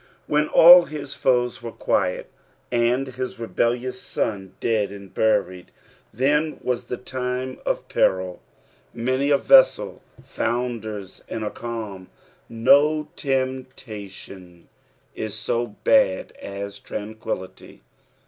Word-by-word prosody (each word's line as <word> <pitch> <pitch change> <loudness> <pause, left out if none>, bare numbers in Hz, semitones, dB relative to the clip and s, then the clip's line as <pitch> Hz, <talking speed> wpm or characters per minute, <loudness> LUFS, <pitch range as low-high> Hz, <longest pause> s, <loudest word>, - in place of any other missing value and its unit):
When 150 0 +1
all 175 +2 +9
his 145 -2 -7
foes 125 -2 +1
were 115 - -6
quiet, - - -1 0.4
and 120 +2 +2
his 130 -1 -6
rebellious 120 +4 -1
sou 95 -3 -3
dead 110 -3 0
and 100 -1 -11
buned, 90 -5 +1 0.5
then 150 +5 +1
was 125 -1 -1
the 125 - -4
time 130 +1 -4
o( - - +3
peril. 95 -1 0 0.5
Many 130 +4 0
a 140 - +5
vessel - - +4 0.2
founders 110 -5 -4
in 110 - -4
a 105 - -3
calm. 110 -6 -6 0.4
No 150 +6 +3
temptation 120 - -5 0.4
is 110 -1 -5
so 115 +2 -1 0.2
bad 270 - +3
as 100 0 -6
tranquillity. 105 -3 -7
120 Hz, 110 wpm, -23 LUFS, 105-130 Hz, 0.5 s, all